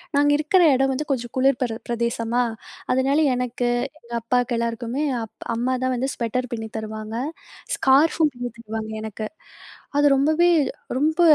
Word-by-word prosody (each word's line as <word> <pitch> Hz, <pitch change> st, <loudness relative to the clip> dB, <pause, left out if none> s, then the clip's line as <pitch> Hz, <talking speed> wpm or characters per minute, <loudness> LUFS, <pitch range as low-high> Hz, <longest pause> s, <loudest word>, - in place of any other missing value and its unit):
நாங்க 290 Hz, +1 st, +4 dB
இருக்கிற 330 Hz, +5 st, +3 dB
இடம் 270 Hz, +1 st, +2 dB
வந்து 300 Hz, +4 st, -3 dB
கொஞ்சம் 240 Hz, -3 st, -2 dB
குளிர் 265 Hz, 0 st, +3 dB
பெர 230 Hz, -3 st, -1 dB
பிரதேசமா! 235 Hz, 0 st, 0 dB, 0.5 s
அதனால 270 Hz, +3 st, +2 dB, 0.2 s
எனக்கு, 245 Hz, 0 st, -1 dB, 0.3 s
எங்க 235 Hz, 0 st, -12 dB
அப்பாக்கு 245 Hz, +1 st, +1 dB
எல்லாருக்குமே 235 Hz, +4 st, -2 dB, 0.2 s
அப் 225 Hz, -, -11 dB
அம்மாதான் 255 Hz, +2 st, 0 dB
வந்து 260 Hz, +2 st, -1 dB
ஸ்வெட்டர் 250 Hz, +2 st, -2 dB
பின்னி 225 Hz, -1 st, -4 dB
தருவாங்க. 215 Hz, 0 st, -5 dB, 0.6 s
ஸ்கார்ஃபும் 300 Hz, +3 st, +4 dB
பின்னி 245 Hz, 0 st, -4 dB
தருவாங்க 220 Hz, -1 st, -5 dB
எனக்கு. 215 Hz, 0 st, -5 dB, 0.7 s
அது 290 Hz, 0 st, +5 dB
ரொம்பவே 310 Hz, +5 st, +3 dB, 0.5 s
ரொம்ப 310 Hz, +5 st, +2 dB
245 Hz, 135 wpm, -23 LUFS, 230-275 Hz, 0.7 s, அது